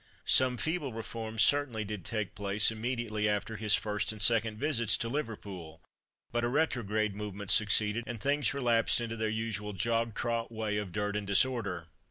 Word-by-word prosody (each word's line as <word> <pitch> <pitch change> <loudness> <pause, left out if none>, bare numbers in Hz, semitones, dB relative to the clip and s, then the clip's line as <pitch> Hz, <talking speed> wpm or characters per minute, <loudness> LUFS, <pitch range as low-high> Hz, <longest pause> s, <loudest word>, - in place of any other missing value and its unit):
Some 130 -1 +3
feeble 155 0 -1
reforms 110 -1 -1
certainly 130 -6 +2
did 105 -3 -5
take 110 -3 -3
place 100 +2 +1
immediately 110 -2 -1
after 105 +2 -1
his 105 0 +3
first 105 0 -1
and 110 - -8
second 115 0 +3
visits 115 -5 +2
to 115 - -2
Liverpool, 100 - -5 0.5
but 120 0 0
a - - +2
retrograde 110 -7 0
movement 100 -1 -4
succeeded, 105 +2 +3
and 120 -2 -5
things 140 +4 +2
relapsed 120 -5 +3
into 115 -1 -3
their 110 -1 -1
usual 110 -1 -3
jog 115 +3 0
trot 115 -1 -1
way 110 -2 -2
of 105 -3 -3
dirt 105 +1 -2
and 105 -1 -2
disorder. 100 -5 +1
110 Hz, 170 wpm, -31 LUFS, 105-120 Hz, 0.5 s, Some